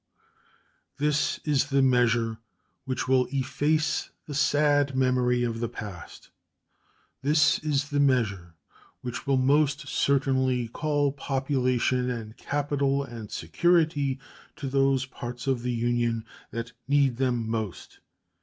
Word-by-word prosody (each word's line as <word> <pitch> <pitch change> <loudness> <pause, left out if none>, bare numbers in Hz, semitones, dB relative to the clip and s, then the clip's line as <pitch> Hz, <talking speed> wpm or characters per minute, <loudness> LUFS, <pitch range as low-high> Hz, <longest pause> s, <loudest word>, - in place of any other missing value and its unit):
This 150 0 +1
is 145 -4 +2
the 135 -1 +3
measure 115 -3 +2 0.5
which 130 -2 -2
will 130 -1 +3
efface 145 +3 0 0.2
the 150 - -7
sad 145 -1 +2
memory 125 -1 +2
of 115 -1 -2
the 115 -1 -2
past; 105 -7 -9 0.9
this 150 +2 +3
is 145 -2 -1
the 145 - +1
measure 105 -11 +1 0.5
which 125 +1 -6
will 135 -1 +3
most 145 +2 +2
certainly 130 -4 +1
call 145 +3 0
population 130 -2 0
and 115 -3 -5
capital 140 -1 0
and 115 -5 -8
security 145 - +1 0.4
to 140 - -5
those 135 -1 +2
parts 125 -1 -7
of 130 -3 0
the 125 +1 -2
Union 120 -1 0 0.2
that 115 0 -5 0.2
need 140 -3 +3
them 125 -3 0
most. 110 -7 -4
130 Hz, 120 wpm, -27 LUFS, 120-145 Hz, 0.9 s, the